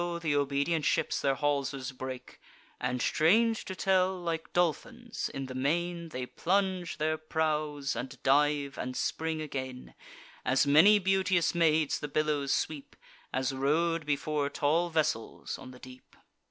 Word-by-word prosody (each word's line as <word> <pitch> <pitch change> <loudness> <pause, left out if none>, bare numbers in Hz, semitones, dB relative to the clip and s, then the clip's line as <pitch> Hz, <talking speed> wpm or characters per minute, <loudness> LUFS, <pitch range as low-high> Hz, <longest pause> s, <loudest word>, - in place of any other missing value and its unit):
th' 170 - -13
obedient 145 +3 +1
ships - - +1
their 135 -1 +2
haulsers 140 -2 -1
break; 130 0 -8 0.4
And, 125 - -1
strange 220 +8 +3
to 190 - -5
tell, 185 0 +2
like 165 -2 -4
dolphins, 225 - -1
in 135 - -5
the 130 - -7
main 170 +5 -1
They 125 -4 -4
plunge 185 +2 -1
their 155 +1 0
prows, 155 -3 -1
and 135 +2 -5
dive, 145 0 +2
and 130 0 -4
spring 160 -1 -2
again: 130 -3 -6 0.5
As 130 +3 +3
many 160 +9 +7
beauteous 190 -3 +2
maids 160 -3 +2
the 145 - -4
billows 145 -1 0
sweep, 150 -3 -2 0.4
As 130 +1 -1
rode 155 +4 0
before 145 0 0
tall 160 +5 +1
vessels 155 -8 -2
on - - -10
the 130 - -12
deep. 130 0 -14
150 Hz, 140 wpm, -30 LUFS, 135-170 Hz, 0.5 s, many